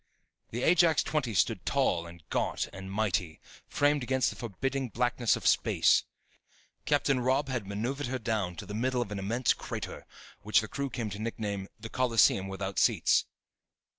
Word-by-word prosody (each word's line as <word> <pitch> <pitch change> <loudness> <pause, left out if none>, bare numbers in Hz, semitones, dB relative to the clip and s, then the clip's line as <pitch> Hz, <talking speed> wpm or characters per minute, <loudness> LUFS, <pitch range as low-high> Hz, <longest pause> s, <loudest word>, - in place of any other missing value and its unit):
The 120 +2 -4
Ajax 170 -2 +4
XX 135 -8 -1
stood - - +1
tall 85 0 +1
and 85 -3 -14
gaunt - - 0
and 95 0 -8
mighty, 95 -6 -1 0.3
framed 145 0 +2
against 130 +1 +1
the - - -9
forbidding 130 +4 -3
blackness 120 +1 +1
of - - -7
space. - - +4 0.8
Captain 145 -2 +2
Robb 130 +3 +1
had 120 -6 -3
maneuvered 120 +8 -3
her 130 +1 -2
down 110 -7 -2
to 105 - -7
the 105 - -7
middle 125 +3 0
of 105 - -12
an 100 - -3
immense 115 +5 +1
crater, - - -6 0.3
which 105 +1 +3
the 110 - -6
crew 140 +3 -3
came 115 -3 -4
to 100 - -6
nickname 105 -3 -3
"the 115 - -7
coliseum 115 -6 +3
without 95 0 -3
seats." - - +3
115 Hz, 165 wpm, -30 LUFS, 100-130 Hz, 0.8 s, Ajax